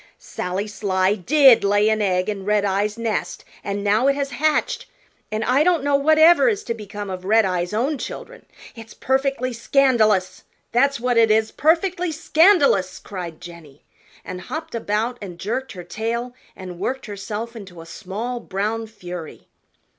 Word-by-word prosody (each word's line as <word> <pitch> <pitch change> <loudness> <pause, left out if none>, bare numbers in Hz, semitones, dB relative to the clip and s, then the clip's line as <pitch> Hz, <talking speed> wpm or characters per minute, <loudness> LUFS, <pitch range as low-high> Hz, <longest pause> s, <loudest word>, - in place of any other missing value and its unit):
"Sally 185 +3 -4
Sly 195 -2 0
DID 255 - +5
lay 205 +1 +3
an 220 0 +1
egg 185 -2 +1
in 205 -2 -4
Redeye's 205 +1 0
nest, 230 -2 -3 0.2
and 200 0 -3
now 215 +6 +2
it 275 - +3
has 280 -1 -3
hatched 310 - 0 0.4
and 215 +1 -2
I 260 +6 +3
don't 345 -3 +2
know 285 0 +2
whatever 315 - +5
is 420 -2 -2
to 230 - -3
become 205 -2 -7
of 185 0 -6
Redeye's 185 -4 +1
own 260 +7 -1
children. - - -8 0.3
It's 225 -1 -12
perfectly 265 -1 -1
scandalous! 230 -6 +2 0.3
That's 275 +2 +2
what 245 0 0
it 225 -1 +5
is, 220 0 +2
perfectly 345 +2 +1
scandalous!" 310 - +3
cried 175 -5 -8
Jenny, 165 -5 -13 0.4
and 185 0 -6
hopped 315 - -7
about 230 +2 -2
and 180 -4 -8
jerked 235 +9 -4
her 180 -2 -8
tail 230 +6 -4 0.2
and 180 -2 -9
worked 260 +7 -3
herself 210 +3 -6
into 190 -6 -10
a 165 - -10
small 215 +8 -5
brown 220 +2 -3
fury. 180 -6 -9
220 Hz, 155 wpm, -21 LUFS, 195-265 Hz, 0.4 s, DID